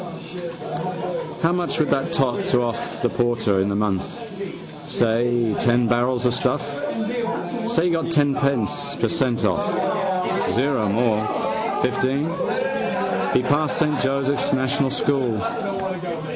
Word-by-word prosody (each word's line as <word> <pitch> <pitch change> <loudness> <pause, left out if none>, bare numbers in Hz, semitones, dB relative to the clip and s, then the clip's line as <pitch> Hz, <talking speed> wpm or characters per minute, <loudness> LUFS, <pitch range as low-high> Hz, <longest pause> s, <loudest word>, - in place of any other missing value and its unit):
How 165 - +4
much 175 -2 0
would 155 - +2
that 135 +4 +1
tot 135 -7 +1
to 125 -1 +3
off 115 -1 -4
the 120 - +3
porter 115 -6 +1
in 100 - +1
the 100 - 0
month? 105 - -1 0.7
Say 120 -1 +2
ten 120 0 +3
barrels 120 +1 +1
of 125 - +3
stuff. 125 +3 +1 1.1
Say 235 -8 +2
he - - +3
got 165 0 0
ten 145 -3 +3
per 140 -6 +2 0.4
cent 130 -9 +1
off. 95 -4 +2 1.0
O 125 -5 +2
more. 110 0 0
Fifteen. 135 +3 +1 1.1
He 125 - +3
passed 150 +2 +2
Saint 150 -2 +1
Joseph's 140 +1 +1
National 130 +1 +1
school. 135 -4 +1
125 Hz, 120 wpm, -22 LUFS, 115-145 Hz, 1.1 s, How